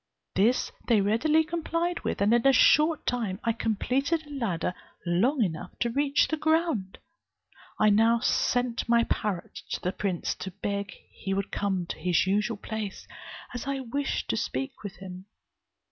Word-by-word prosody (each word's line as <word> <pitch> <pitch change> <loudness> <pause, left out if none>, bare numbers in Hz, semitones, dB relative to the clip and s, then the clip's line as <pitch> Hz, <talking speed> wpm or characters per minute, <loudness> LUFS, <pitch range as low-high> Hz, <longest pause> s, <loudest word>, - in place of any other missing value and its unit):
This 225 +6 +2 0.2
they 230 -3 +4
readily 240 +11 +3
complied 340 +1 -2
with, - - -3
and 205 +3 +4
in 240 +2 +4
a - - +8
short 305 +4 +5
time 220 -6 -1
I 230 - +2
completed 260 +9 0
a 295 - -13
ladder 195 -10 -1 0.3
long 225 - +2
enough 175 -1 -4
to 235 - 0
reach 280 +2 +2
the 315 - -1
ground. 315 - 0 0.8
I 215 0 +5
now 225 +3 +4
sent 245 0 0
my 235 0 +5
parrot 205 -6 -3
to - - -2
the 180 - -1
prince, 190 -3 -2
to 190 - -5
beg 200 +1 -3 0.2
he 195 0 -3
would 195 0 -2
come 190 -3 -1
to - - -6
his 180 0 +2
usual 210 +3 0
place, 210 -1 -5 0.5
as 245 +2 -5
I 275 -1 -1
wished 270 +3 -2
to - - -1
speak 270 0 -3
with 205 -2 -7
him. 185 -1 -9
230 Hz, 165 wpm, -27 LUFS, 195-275 Hz, 0.8 s, a